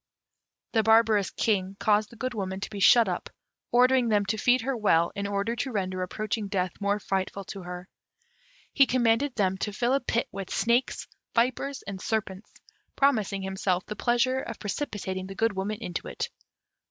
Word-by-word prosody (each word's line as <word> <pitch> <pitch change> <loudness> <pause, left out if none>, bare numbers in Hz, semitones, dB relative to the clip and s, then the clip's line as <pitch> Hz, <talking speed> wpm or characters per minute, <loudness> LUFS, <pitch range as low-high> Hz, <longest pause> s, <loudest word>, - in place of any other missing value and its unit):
The 225 - +3
barbarous 220 -2 +4
King 195 -3 -1
caused 210 0 +2
the - - -14
Good 255 +2 -3
Woman 190 -3 -3
to - - -5
be 205 - -5
shut 230 +3 +6
up, 180 -2 -3 0.4
ordering 250 0 +4
them 205 -2 +2
to 210 +3 -1
feed 250 +2 +3
her 265 +3 -1
well, 170 -7 +3
in 200 0 -3
order 200 +3 -1
to 265 - -2
render 185 -4 -2
approaching 215 +3 -3
death 185 -2 -1
more 200 +1 +1
frightful 195 0 -2
to 195 +1 -8
her. 180 +1 -7 0.9
He 275 -2 +5
commanded 245 +2 +2
them 190 -2 +1
to 210 - -2
fill 240 +5 0
a 275 - +3
pit 235 -3 -1
with 195 -1 -6
snakes, 235 +3 +1 0.3
vipers, 255 +4 0
and 195 -1 -7
serpents, 210 -2 -3 0.4
promising 215 -8 +2
himself 190 -1 -1
the 210 - -6
pleasure 255 +3 +1
of 230 -4 -6
precipitating 195 -5 -4
the 195 - -8
Good 225 +1 +1
Woman 200 +3 -2
into 180 -7 -5
it. - - -4
210 Hz, 180 wpm, -27 LUFS, 190-235 Hz, 0.9 s, shut